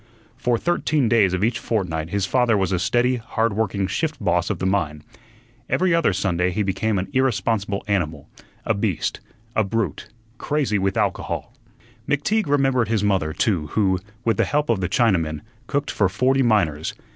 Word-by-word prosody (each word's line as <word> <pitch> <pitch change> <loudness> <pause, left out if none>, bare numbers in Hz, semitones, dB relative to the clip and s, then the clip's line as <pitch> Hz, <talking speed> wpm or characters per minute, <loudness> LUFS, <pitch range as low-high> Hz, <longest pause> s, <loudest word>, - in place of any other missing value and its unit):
For 125 -2 0
thirteen 155 -3 +1
days 100 -5 +4
of 95 - -2
each 115 +1 +1
fortnight 85 -8 -2
his 100 +1 0
father 120 0 +2
was 95 -1 0
a 90 - +1
steady, 120 +6 +2
hard 115 -1 -1
working 100 -2 0
shift 155 - -2
boss 85 0 +1
of - - -1
the - - -3
mine. 85 -6 -1 0.7
Every 185 -1 +2
other 165 -9 +3
Sunday 90 -2 0
he 105 +4 -1
became 100 +2 0
an 90 - -2
irresponsible 115 -6 0
animal, 80 -7 -1 0.4
a 110 - +2
beast, 100 -5 -1 0.4
a 110 - +3
brute, 100 -6 -2 0.3
crazy 140 -9 0
with 95 +3 0
alcohol. 100 -3 -2 0.6
McTeague 155 +8 +1
remembered 135 -4 +2
his 110 -2 0
mother, 95 -7 +1
too, 85 -3 0
who, 95 -2 +1 0.3
with 115 -3 +2
the - - +3
help 150 -3 +1
of 105 -4 0
the 90 - -1
Chinaman, 85 -10 +1 0.3
cooked 140 0 -1
for 100 -3 +2
forty 130 +7 +2
miners. 90 - +1
105 Hz, 170 wpm, -22 LUFS, 95-120 Hz, 0.7 s, days